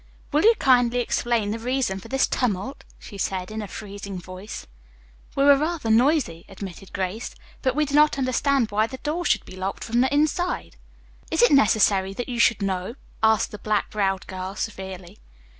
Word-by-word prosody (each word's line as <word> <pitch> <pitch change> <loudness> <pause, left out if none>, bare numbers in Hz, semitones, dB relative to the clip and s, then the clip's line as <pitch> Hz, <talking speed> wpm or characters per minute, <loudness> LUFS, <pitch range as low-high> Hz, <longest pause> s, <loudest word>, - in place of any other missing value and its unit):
"Will 300 +1 +3
you 455 +4 +6
kindly 245 -2 +4
explain 235 -3 0
the 225 - -3
reason 245 -5 -1
for - - -12
this 270 0 +2
tumult?" 245 +2 -2
she 200 - -11
asked 185 0 -2
in 220 0 -4
a 210 - -6
freezing 200 -1 -7
voice. 185 +3 -8 0.7
"We 275 - +2
were 285 0 +8
rather 305 -5 -1
noisy," 240 - +2
admitted 195 -1 -9
Grace, 195 +4 -4 0.3
"but 260 -2 0
we 300 0 +2
did 285 - -6
not 300 0 +5
understand 260 -2 +1
why 215 +2 +2
the 260 - -8
door 310 +6 -3
should - - +2
be - - -11
locked 190 +1 -4
from 235 +1 +1
the 260 - +2
inside." 310 +5 0 0.5
"Is - - +2
it 485 - +6
necessary 200 -6 +4
that 245 +4 -4
you 240 -1 -3
should 225 -3 +3
know?" 190 +3 -2 0.3
asked 220 0 +3
the 210 - -8
black 210 0 -1
browed 195 -3 0
girl 185 +1 -6
severely. 190 -3 -6
220 Hz, 185 wpm, -24 LUFS, 195-270 Hz, 0.7 s, were